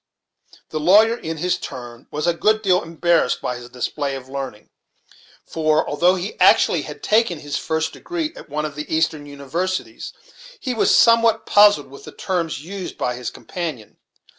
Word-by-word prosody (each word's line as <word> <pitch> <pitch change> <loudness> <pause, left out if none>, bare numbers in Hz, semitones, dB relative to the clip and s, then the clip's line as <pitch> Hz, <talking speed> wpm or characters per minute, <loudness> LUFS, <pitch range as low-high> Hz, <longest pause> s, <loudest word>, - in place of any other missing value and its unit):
The 155 - -3
lawyer 210 +8 +5
in 160 -7 -6
his 180 +3 0
turn 120 -1 -9
was 150 +2 -3
a 175 - +3
good 215 +5 +1
deal 185 -2 +3
embarrassed 165 -4 +1
by 125 -1 -4
this 120 0 -11
display 135 +3 -3
of 130 -1 -9
learning; 130 -6 -7 0.7
for, 155 -1 +1
although 175 +5 +3
he 190 +3 -5
actually - - +5
had - - -9
taken 215 -5 +2
his 145 -1 -6
first 160 0 -2
degree 335 -3 -4
at - - -12
one 150 +1 -2
of 150 - -5
the 150 +1 -7
eastern 160 -2 0
universities, 145 +7 -4 0.5
he 255 - -3
was 225 - +2
somewhat 230 -1 +4
puzzled 205 -10 +5
with 140 - -12
the - - -9
terms 165 -5 -3
used 195 +1 -7
by 125 - -1
his 125 0 -5
companion. 155 - -7
160 Hz, 170 wpm, -21 LUFS, 140-190 Hz, 0.7 s, lawyer